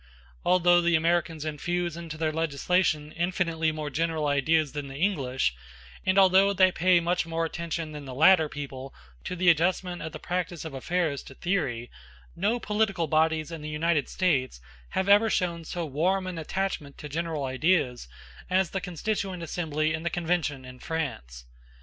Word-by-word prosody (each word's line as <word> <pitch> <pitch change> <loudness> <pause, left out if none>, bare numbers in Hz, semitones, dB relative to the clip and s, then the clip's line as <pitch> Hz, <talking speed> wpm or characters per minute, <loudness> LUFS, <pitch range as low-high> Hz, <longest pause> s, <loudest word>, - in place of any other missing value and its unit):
Although 175 -1 +4
the 170 0 +3
Americans 165 -1 +1
infuse 175 +3 -2
into 165 -2 -7
their 160 -1 0
legislation 155 0 0
infinitely 170 -2 0
more 155 -1 -5
general 160 +1 -1
ideas 145 +1 +2
than 145 0 -5
the 135 - -9
English, 135 - 0 0.5
and 190 +1 +3
although 195 +1 +6
they 185 -1 +5
pay 180 0 +4
much 170 0 0
more 165 0 -1
attention 165 -1 -4
than 150 -1 -8
the 130 -2 -7
latter 160 +1 +6
people 135 -2 -7 0.3
to 180 - -3
the 180 0 -1
adjustment 175 +2 0
of 160 +1 -5
the 155 - -7
practice 175 0 -3
of 160 - -6
affairs 155 +1 -1
to 135 - -13
theory, 135 -11 -2 0.4
no 210 +7 0
political 210 -6 0
bodies 155 +1 +1
in 165 -2 -6
the 150 - -5
United 155 -1 0
States 140 - 0 0.4
have 190 - +1
ever 205 +3 +6
shown 170 -4 -1
so 170 +1 -4
warm 180 +7 0
an 180 -3 -4
attachment 160 -4 -3
to 150 - -7
general 160 0 -3
ideas 130 - +1 0.4
as 185 -1 +2
the 195 - -2
Constituent 185 0 -3
Assembly 155 -2 -1
and 160 +1 -4
the 170 - 0
Convention 165 -6 -1
in 125 0 -11
France. 95 - -4
165 Hz, 170 wpm, -27 LUFS, 150-180 Hz, 0.5 s, although